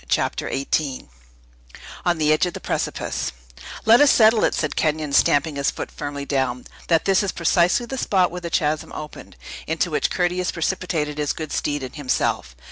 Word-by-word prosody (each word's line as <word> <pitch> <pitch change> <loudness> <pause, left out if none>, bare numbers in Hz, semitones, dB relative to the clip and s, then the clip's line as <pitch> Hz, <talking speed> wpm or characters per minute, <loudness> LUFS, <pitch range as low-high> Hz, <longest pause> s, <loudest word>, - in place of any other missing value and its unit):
CHAPTER - - 0
XVIII 135 - -2 1.0
ON 175 -1 +2
THE 155 -1 +3
EDGE 155 +4 +2
OF 175 - -5
A - - -8
PRECIPICE - - -3 0.5
"Let 230 +4 +7
us 290 - +7
settle 220 -2 +5
it," - - 0
said 155 - -2
Kenyon, 155 -2 0
stamping 145 +1 +3
his 140 - +1
foot - - -6
firmly 145 -1 -5
down, 130 -3 -1 0.2
"that 165 -2 +2
this 195 -1 +3
is 200 -2 -1
precisely 175 +7 +2
the 265 +2 -5
spot 185 -6 +2
where 180 +1 -6
the 170 - -5
chasm 155 -2 0
opened, 150 -1 -9 0.3
into 165 +2 -1
which 150 - +1
Curtius 180 0 0
precipitated 160 -4 -2
his 145 -1 0
good 155 -2 -6
steed 145 -2 -1
and 130 - -7
himself. 125 - -1
155 Hz, 180 wpm, -22 LUFS, 145-180 Hz, 1.0 s, Let